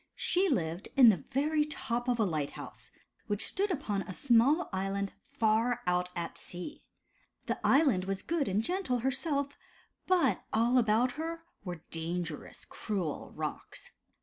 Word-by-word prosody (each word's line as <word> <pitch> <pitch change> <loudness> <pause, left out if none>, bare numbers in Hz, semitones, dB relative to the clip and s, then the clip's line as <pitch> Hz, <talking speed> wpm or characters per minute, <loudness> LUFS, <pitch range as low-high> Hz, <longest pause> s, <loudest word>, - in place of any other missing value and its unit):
She 370 +2 +2
lived 170 - -1
in 255 -4 +9
the 180 -9 +1
very 300 +3 +2
top 245 -5 -3
of 245 -1 +2
a - - +4
light 155 -7 -1
house, - - -9 0.4
which 205 -1 +1
stood 400 +2 0
upon 225 - -1
a 185 -1 -7
small 275 +7 +4
island 195 +1 -2 0.2
far 230 -1 +2
out 180 0 +1
at 170 -1 -4
sea. 180 - -6 0.6
The - - -2
island 270 - +4
was 195 0 -3
good 330 -4 0
and 200 +3 +1
gentle 355 -5 0
herself, 280 +2 -1 0.5
but 335 - +3
all 235 +3 +4
about 230 +2 +3
her 330 0 -4 0.2
were 175 -4 -6
dangerous, 165 -1 -4
cruel 185 -8 -3
rocks. - - -6
230 Hz, 150 wpm, -31 LUFS, 185-285 Hz, 0.6 s, in